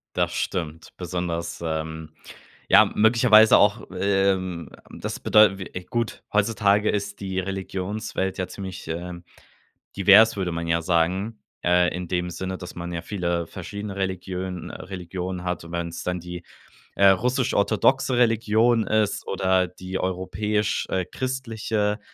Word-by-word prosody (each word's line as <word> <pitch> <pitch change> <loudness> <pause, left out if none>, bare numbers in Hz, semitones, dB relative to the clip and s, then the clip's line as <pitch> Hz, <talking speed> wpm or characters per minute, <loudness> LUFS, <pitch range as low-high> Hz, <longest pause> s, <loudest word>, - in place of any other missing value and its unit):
Das - - 0
stimmt 80 -3 -4
besonders, 85 -2 -3
ähm 80 -1 -4 0.6
ja, - - +8
möglicherweise 110 0 +6
auch, - - +2
ähm, 95 -3 0 0.2
das - - -6
bedeutet 105 -2 +5
w 90 0 -7
gut, 115 -2 -3
heutzutage 105 -1 +2
ist 100 0 -3
die 95 -1 -3
Religionswelt 95 +1 -3
ja 95 -1 -2
ziemlich, 95 -4 -8
ähm, 85 +1 -5 0.7
divers, 100 +3 +6
würde 95 -2 -1
man 85 0 -3
ja 85 0 +1
sagen, 90 +6 0 0.3
äh, 90 -1 +3
in 90 -1 -5
dem 90 -1 -1
Sinne, 95 +2 -5
dass 90 - -9
man 85 0 -6
ja 85 - -4
viele 85 -3 -2
verschiedene 100 +3 -7
Religiönen 95 -1 -4
äh, - - -8
Religionen 90 -1 -5
hat. 90 -1 -2
Und 85 - -11
wenn's 85 -1 -4
dann 90 0 -1
die, 90 0 -8 0.5
äh, 100 - +5
russisch-orthodoxe 125 +3 +2
Religion 115 0 +3
ist 110 -2 0
oder 95 -1 +1
die 95 +1 -6
europäisch 95 +3 -1
äh, 95 -2 -1
christliche, 110 -4 -2
95 Hz, 135 wpm, -24 LUFS, 90-105 Hz, 0.7 s, ja